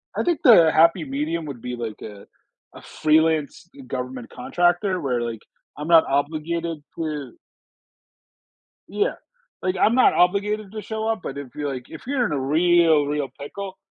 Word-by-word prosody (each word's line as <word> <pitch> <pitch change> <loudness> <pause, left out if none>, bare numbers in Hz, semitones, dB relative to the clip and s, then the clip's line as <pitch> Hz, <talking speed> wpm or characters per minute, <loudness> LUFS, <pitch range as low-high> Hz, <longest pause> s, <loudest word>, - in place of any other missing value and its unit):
I - - 0
think 345 -3 0
the 170 -10 +7
happy 165 +1 +4
medium 155 +4 -3
would 135 -5 -8
be 125 0 -5
like, 115 -3 -6
uh, 105 -2 -10 0.5
a - - -11
freelance 155 0 +1 0.2
government 125 -1 -5
contractor 175 +7 0
where, 125 -4 -1
like, 115 -2 -4 0.4
I'm 150 +2 -5
not 165 -1 +7
obligated 155 +3 -2
to 155 -3 -4 1.6
yeah. 420 - -1 0.5
Like, 185 0 -1
I'm 220 +5 +3
not 255 - +5
obligated 200 +3 +1
to 215 0 -6
show 220 +2 -4
up, 225 -1 0
but 140 - -6
if 130 -4 -9
you're, 145 -1 -3
like, 125 -1 -7
if - - -10
you're 265 -3 +1
in - - -2
a 145 - -1
real 160 +2 +3
real 145 -1 -2
pickle, 190 +6 -7
160 Hz, 165 wpm, -23 LUFS, 140-185 Hz, 1.6 s, the